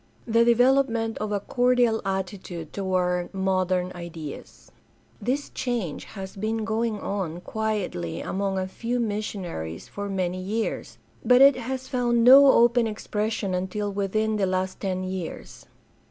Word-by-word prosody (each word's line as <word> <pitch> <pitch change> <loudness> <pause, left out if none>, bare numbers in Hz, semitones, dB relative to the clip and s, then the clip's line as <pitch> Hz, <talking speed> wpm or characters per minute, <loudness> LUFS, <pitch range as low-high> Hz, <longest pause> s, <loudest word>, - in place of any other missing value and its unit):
The 230 0 +4
development 235 -1 +3
of 215 0 -3
a 205 - 0
cordial 245 0 +2
attitude 190 -4 -4
toward 180 -2 0
modem 185 -1 0
ideas. 165 -4 -9 0.2
— - - -34
This 275 +4 -2
change 235 - -3
has 190 -2 -8
been 215 +2 -2
going 220 -1 -1
on 180 -5 -3
quietly 195 - -3
among 195 0 -2
a 185 0 -1
few 235 +5 -3
missionaries 195 - -4
for 205 0 -6
many 185 -1 -2
years, 215 +4 -3 0.3
but 250 0 +5
it 275 0 +8
has 260 +1 -4
found 240 -2 +1
no 270 +3 +9
open 235 -1 +4
expres 215 0 -2
sion 195 -4 -2
until 190 +3 -2
within 215 +2 0
the 195 -2 +1
last 185 0 -2
ten 185 -2 -2
years. 185 -2 -6
205 Hz, 140 wpm, -25 LUFS, 185-230 Hz, 0.3 s, no